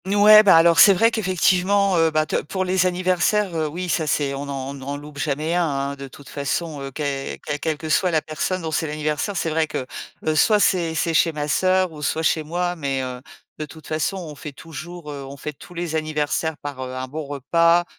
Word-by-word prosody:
Mouais, 205 +2 +8
bah 195 -5 +6
alors 165 0 +5
c'est 200 - +9
vrai 225 +5 +4
qu'effectivement, 190 -1 +2
heu 165 0 +4
bah, 155 0 +1
te - - -3
pour 190 +4 -3
les 185 0 +2
anniversaires, 185 +2 +1
heu, 160 -1 0
oui, 175 +5 -5
ça, 160 -2 0
c'est 140 -1 0
on 140 +1 -5
n'en 135 -1 -4
on - - -7
n'en 140 +1 -6
loupe 145 0 -10
jamais 150 +3 -1
un, 175 0 +2 0.3
hein. - - -6
De 140 0 -8
toute 135 +1 -15
façon, 145 +1 -3
heu, 135 - -5
que 140 -1 -3
quelle 150 -1 -3
quelle 160 -1 -2
que 160 - -7
soit 180 +4 +2
la 160 -3 +1
personne 170 +4 -3
dont 160 - -3
c'est 160 - -1
l'anniversaire, 150 +5 -2
c'est 165 - -1
vrai 160 0 +1
que, 130 - -4 0.4
heu, 155 - +2
soit 210 +7 +4
c'est 175 -4 +2
c'est 165 +1 0
chez 165 +1 +3
ma 150 -1 -3
sœur 185 +2 +2
ou 150 -2 -10
soit 160 +2 -1
chez 160 - +2
moi. 175 +3 -2
Mais, 135 -4 -2
heu, 125 -1 -6 0.4
de 155 - -3
toute 155 +1 -14
façon, 155 +5 -2
on 165 -5 -7
fait 145 0 -9
toujours 165 +1 -9
heu, 140 -1 -7
on 135 +1 -9
fête 150 +1 -7
tous 180 - -13
les 170 -2 -3
anniversaires 155 0 -1
par, 145 -2 -7
heu, 130 0 -6
un 130 0 -4
bon 155 +3 -6
repas. 165 +5 +2
160 Hz, 235 wpm, -22 LUFS, 145-180 Hz, 0.4 s, c'est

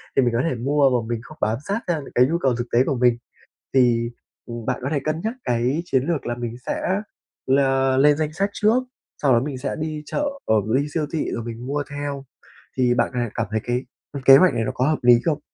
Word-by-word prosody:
thì - - +5
mình 120 -2 +1
có 115 - +2
thể - - -2
mua 140 +4 +2
mà 110 - -8
mình 115 -1 -2
không 155 +4 -13
bám 110 +2 +1
sát 200 +3 0
sang 165 -4 -1
những - - -12
cái 125 - +6
nhu 165 +4 0
cầu 135 -7 +1
thực 120 +1 -4
tế 120 +2 +5
của 135 - 0
mình. 120 -1 +3 0.6
Thì, 120 -3 +3 0.3
ừm, 120 -1 -7
bạn 125 - -1
có 135 - -1
thể 150 - +1
cân 155 +1 -1
nhắc 220 +2 -1
cái 125 +6 0
chiến 130 -5 +1
lược 165 -4 -2
là 120 - -2
mình 120 -1 -5
sẽ 190 +3 -1 0.5
là 135 -1 +2
lên 145 +2 +5
danh 155 -1 -2
sách 195 +5 0
trước, 225 +5 +2 0.4
sau 140 -3 +4
đó 120 - +5
mình 140 0 -4
sẽ 135 +2 -3
đi 155 -1 -4
chợ 295 - -2 0.2
ở 110 -1 +3
mình 110 +7 +1
đi 150 - -6
siêu 155 -2 0
thị 160 - -1
rồi 115 - -3
mình 120 +2 -7
mua 145 +1 -1
theo. 145 -1 -5 0.5
Thì 125 -1 +3
bạn - - +1
có 125 - -3
thể 120 - -1
cảm 115 - -1
thấy 110 0 -1
cái, 125 +1 -1 0.3
ưm, 140 -2 -6
kế 135 +1 +9
hoạch 185 +2 +5
này 115 -1 0
nó - - -2
có 130 - +1
hợp 155 - +1
lý 120 -1 +6
không? 155 -3 +1
135 Hz, 265 wpm, -22 LUFS, 120-150 Hz, 0.6 s, kế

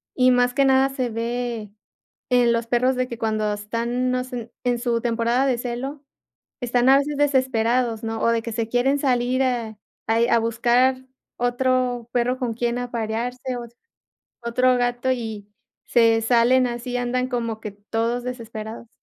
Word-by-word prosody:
y 255 -1 +4
más 245 0 +3
que 275 +1 +3
nada 265 0 +4
se 260 -2 -2
ve 230 -1 -3 0.6
en 245 -1 +4
los 230 0 -1
perros 250 +2 +2
de 255 0 -1
que 235 -2 -7
cuando 215 -1 0
están, 235 +4 -2
no 255 0 0
sé, 245 -3 -7
en 245 -1 +1
su 235 -1 0
temporada 235 +2 +1
de 255 -3 +1
celo, 260 +4 -5 0.6
están 245 +1 +2
a 270 - +8
veces 285 +1 -1
desesperados, 250 -4 +1
¿no?, 225 0 -3
o 230 - +3
de 230 -1 +1
que 230 - -6
se 225 0 -2
quieren 255 +4 +2
salir 255 -1 +1
a 235 -4 -2 0.3
ahí 225 +1 +3
a 235 - +4
buscar 240 +3 +2 0.4
otro 245 -1 0
perro 250 +1 +1
con 245 -3 -2
quién 235 +1 -1
aparearse, 245 +1 -3
ot 235 -1 -8 0.7
otro 250 +2 +2
gato, 245 +1 0
y 220 -4 -5 0.4
se 230 -1 +4
salen 245 +2 +4
así, 245 +1 -4
andan 250 +1 -1
como 230 -3 -3
que 210 - -5
todos 225 +4 -2
desesperados. 230 -2 -7
245 Hz, 165 wpm, -23 LUFS, 230-255 Hz, 0.7 s, a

